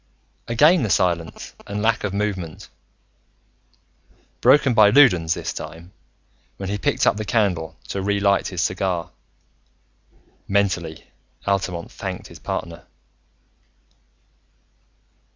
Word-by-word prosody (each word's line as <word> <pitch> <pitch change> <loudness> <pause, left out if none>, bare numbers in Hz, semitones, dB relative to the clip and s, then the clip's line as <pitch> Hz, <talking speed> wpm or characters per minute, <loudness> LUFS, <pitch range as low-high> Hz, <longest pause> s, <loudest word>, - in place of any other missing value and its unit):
Again 150 +9 +5
the 110 - -1
silence 85 -3 -1
and 105 +1 -3
lack 115 0 +1
of 105 - -1
movement, 95 -5 -4 1.7
broken 140 -3 +5
by 110 -3 +6
Loudons 90 - +5
this - - -4
time, 85 +3 -9 0.7
when 95 -1 -5
he 105 0 -2
picked - - +1
up - - +3
the 110 - -3
candle 95 -8 0
to 100 - -3
re 100 +1 0
lit 100 -1 +2
his 90 -2 -3
cigar. 90 -2 -2 1.4
Mentally, 90 -5 0 0.4
Altamont 95 -3 -2
thanked - - -6
his - - -13
partner. 85 0 -5
100 Hz, 110 wpm, -22 LUFS, 85-105 Hz, 1.7 s, by